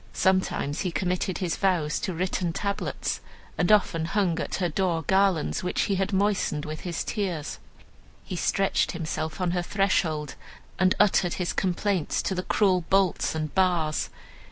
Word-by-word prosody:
Sometimes 185 Hz, -6 st, +1 dB
he 180 Hz, -, -1 dB
committed 180 Hz, +2 st, -1 dB
his 180 Hz, -3 st, -2 dB
vows 175 Hz, -6 st, +1 dB
to -, -, -2 dB
written 180 Hz, -1 st, -1 dB
tablets, 200 Hz, +6 st, -2 dB, 0.3 s
and 175 Hz, -, +2 dB
often 175 Hz, -6 st, +3 dB
hung 180 Hz, -2 st, +1 dB
at -, -, -3 dB
her 180 Hz, -, 0 dB
door 170 Hz, -1 st, 0 dB
garlands 190 Hz, -1 st, +2 dB
which 180 Hz, -, -1 dB
he 200 Hz, -, +1 dB
had 195 Hz, +1 st, 0 dB
moistened 195 Hz, -6 st, +1 dB
with 155 Hz, 0 st, -5 dB
his 175 Hz, -2 st, -3 dB
tears. 180 Hz, -8 st, -3 dB, 0.6 s
He 185 Hz, -, -6 dB
stretched 195 Hz, +3 st, +1 dB
himself 160 Hz, -1 st, -3 dB
on 180 Hz, -2 st, +1 dB
her 175 Hz, 0 st, 0 dB
threshold, 175 Hz, -6 st, 0 dB, 0.5 s
and 185 Hz, 0 st, +4 dB
uttered 195 Hz, -3 st, +3 dB
his 180 Hz, -2 st, -2 dB
complaints 185 Hz, -2 st, 0 dB
to -, -, -1 dB
the 180 Hz, -, -1 dB
cruel 185 Hz, -1 st, +2 dB
bolts 190 Hz, -4 st, +2 dB
and 155 Hz, -2 st, -3 dB
bars. 175 Hz, -5 st, +1 dB
180 Hz, 155 wpm, -26 LUFS, 165-195 Hz, 0.6 s, and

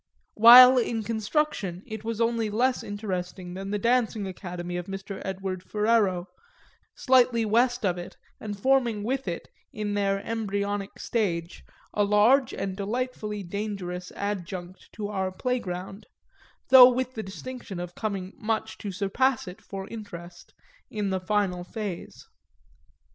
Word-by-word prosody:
While 250 Hz, +3 st, +10 dB
in 230 Hz, -2 st, -1 dB
construction 215 Hz, -, -1 dB
it 220 Hz, -3 st, -7 dB
was 225 Hz, 0 st, -3 dB
only 230 Hz, -1 st, +1 dB
less 245 Hz, +5 st, +1 dB
interesting 185 Hz, -3 st, -5 dB
than 195 Hz, +1 st, -6 dB
the 205 Hz, -, 0 dB
dancing 230 Hz, -1 st, +1 dB
academy 180 Hz, -2 st, -6 dB
of 175 Hz, 0 st, -4 dB
Mr. 195 Hz, 0 st, -6 dB
Edward 190 Hz, -1 st, -4 dB
Ferrero, 210 Hz, -3 st, +1 dB, 0.7 s
slightly 245 Hz, -3 st, +3 dB
west 240 Hz, +2 st, +2 dB
of 180 Hz, -2 st, 0 dB
it 175 Hz, -, -9 dB, 0.2 s
and 205 Hz, -2 st, -6 dB
forming 240 Hz, -3 st, +2 dB
with 260 Hz, +1 st, -2 dB
it, 170 Hz, -1 st, -4 dB, 0.2 s
in 210 Hz, -1 st, -3 dB
their 200 Hz, -1 st, +1 dB
embryonic 205 Hz, -3 st, -2 dB
stage, 175 Hz, -7 st, -2 dB, 0.3 s
a 210 Hz, -, +2 dB
large 220 Hz, +6 st, +4 dB
and 195 Hz, -1 st, -4 dB
delightfully 210 Hz, 0 st, -3 dB
dangerous 180 Hz, -2 st, -5 dB
adjunct 185 Hz, -2 st, -5 dB
to 210 Hz, -1 st, -4 dB
our 190 Hz, -2 st, -2 dB
playground, 195 Hz, -3 st, -4 dB, 0.6 s
though 255 Hz, -1 st, +10 dB
with 255 Hz, 0 st, -2 dB
the 220 Hz, -, -4 dB
distinction 215 Hz, -1 st, -7 dB
of 175 Hz, 0 st, -6 dB
coming 195 Hz, -3 st, -4 dB
much 220 Hz, 0 st, -2 dB
to 205 Hz, -, -5 dB
surpass 220 Hz, +7 st, 0 dB
it 180 Hz, -, -9 dB
for 195 Hz, -1 st, -7 dB
interest 175 Hz, -6 st, -10 dB, 0.3 s
in 205 Hz, -3 st, -2 dB
the 190 Hz, -, 0 dB
final 185 Hz, -2 st, 0 dB
phase. 200 Hz, -1 st, -7 dB
205 Hz, 135 wpm, -27 LUFS, 190-230 Hz, 0.7 s, While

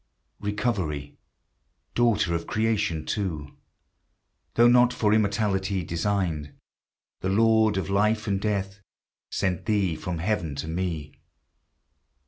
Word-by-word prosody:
Recovery, 100 Hz, -, -2 dB, 0.7 s
daughter 110 Hz, -7 st, +2 dB
of 85 Hz, 0 st, -2 dB
Creation 105 Hz, -8 st, 0 dB
too, 80 Hz, -9 st, -3 dB, 1.0 s
Though 120 Hz, +1 st, +6 dB
not 125 Hz, 0 st, +6 dB
for 105 Hz, -3 st, +2 dB
immortality 100 Hz, -3 st, +1 dB
designed, 85 Hz, -3 st, -1 dB, 0.6 s
The 95 Hz, -, -2 dB
Lord 110 Hz, 0 st, +4 dB
of 95 Hz, -, -1 dB
life 105 Hz, +3 st, +2 dB
and 100 Hz, -2 st, 0 dB
death 100 Hz, -2 st, -2 dB, 0.5 s
Sent 95 Hz, -1 st, -1 dB
thee 100 Hz, -6 st, +1 dB
from 85 Hz, +2 st, -4 dB
heaven 85 Hz, -4 st, -1 dB
to 70 Hz, +3 st, -4 dB
me! 80 Hz, -3 st, -3 dB
100 Hz, 110 wpm, -26 LUFS, 85-105 Hz, 1.0 s, Though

